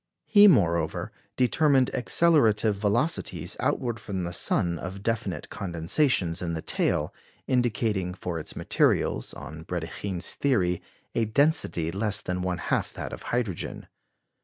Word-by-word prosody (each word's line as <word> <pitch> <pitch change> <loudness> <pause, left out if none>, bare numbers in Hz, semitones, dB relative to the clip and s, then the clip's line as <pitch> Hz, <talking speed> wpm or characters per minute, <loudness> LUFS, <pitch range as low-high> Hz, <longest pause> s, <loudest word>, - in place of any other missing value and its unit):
He, 205 -1 +7
moreover, 85 - +2 0.3
determined 135 0 +3
accelerative 120 -7 +3
velocities 100 - -1
outward 125 -3 -1
from 95 -3 -4
the 85 0 -4
sun 85 -1 0
of 95 +4 -7
definite 115 0 -2
condensations 85 - 0
in 85 -2 -2
the 80 - -3
tail, - - 0 0.3
indicating 110 -7 0
for 90 -3 -4
its 75 - -8
materials, - - +1
on 75 +2 -9
Brédikhine's 90 +2 -3
theory, 90 -11 +1 0.3
a 115 - +1
density 110 - +2
less 100 +2 +1
than 90 0 -3
one 90 -1 -1
half - - -1
that - - -6
of - - -7
hydrogen. 115 -8 -3
100 Hz, 130 wpm, -26 LUFS, 85-125 Hz, 0.3 s, He